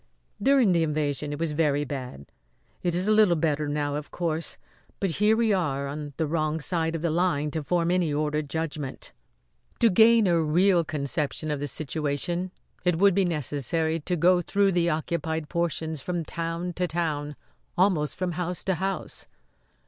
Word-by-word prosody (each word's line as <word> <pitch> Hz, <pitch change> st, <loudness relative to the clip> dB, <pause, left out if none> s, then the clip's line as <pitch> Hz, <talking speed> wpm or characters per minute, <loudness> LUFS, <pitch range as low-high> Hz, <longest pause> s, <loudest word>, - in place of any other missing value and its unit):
"During 265 Hz, -3 st, +4 dB
the 170 Hz, -2 st, +3 dB
invasion 150 Hz, -2 st, -1 dB
it 145 Hz, -, -4 dB
was 165 Hz, -2 st, 0 dB
very 145 Hz, -2 st, +1 dB
bad. 125 Hz, -, -6 dB, 0.6 s
It 175 Hz, -2 st, 0 dB
is 180 Hz, +3 st, -1 dB
a -, -, +3 dB
little 210 Hz, -5 st, +5 dB
better 155 Hz, -2 st, 0 dB
now, 145 Hz, 0 st, -1 dB
of 150 Hz, 0 st, -4 dB
course; 165 Hz, -2 st, -2 dB, 0.4 s
but 195 Hz, -3 st, 0 dB
here 215 Hz, +1 st, +5 dB
we 225 Hz, -2 st, +3 dB
are 140 Hz, -7 st, 0 dB
on 145 Hz, 0 st, -6 dB
the 160 Hz, -, +1 dB
wrong 155 Hz, 0 st, -1 dB
side 165 Hz, 0 st, -1 dB
of 165 Hz, -, -4 dB
the 170 Hz, -, +1 dB
line 155 Hz, -3 st, +1 dB
to 160 Hz, -, -2 dB
form 170 Hz, +4 st, 0 dB
any 180 Hz, -4 st, +1 dB
ordered 150 Hz, 0 st, -1 dB
judgment. 155 Hz, -4 st, -4 dB, 0.7 s
To 230 Hz, -2 st, +4 dB
gain 225 Hz, +3 st, +6 dB
a 170 Hz, -3 st, +3 dB
real 175 Hz, +3 st, +3 dB
conception 150 Hz, 0 st, -2 dB
of 145 Hz, -, -2 dB
the 145 Hz, -, -2 dB
situation 155 Hz, +5 st, -2 dB, 0.3 s
it 180 Hz, -2 st, +2 dB
would 200 Hz, +2 st, +5 dB
be 195 Hz, +1 st, +2 dB
necessary 160 Hz, +1 st, -1 dB
to 175 Hz, +4 st, -2 dB
go 175 Hz, +2 st, +4 dB
through 200 Hz, +3 st, +2 dB
the 175 Hz, -1 st, +2 dB
occupied 160 Hz, 0 st, -2 dB
portions 160 Hz, -3 st, -2 dB
from 175 Hz, +1 st, -3 dB
town 165 Hz, +2 st, -4 dB
to 180 Hz, +1 st, -1 dB
town, 150 Hz, -4 st, -2 dB, 0.4 s
almost 175 Hz, -5 st, +2 dB
from 185 Hz, -1 st, -2 dB
house 180 Hz, +1 st, -4 dB
to 190 Hz, -, +1 dB
house. 190 Hz, +3 st, -4 dB
165 Hz, 175 wpm, -26 LUFS, 150-180 Hz, 0.7 s, gain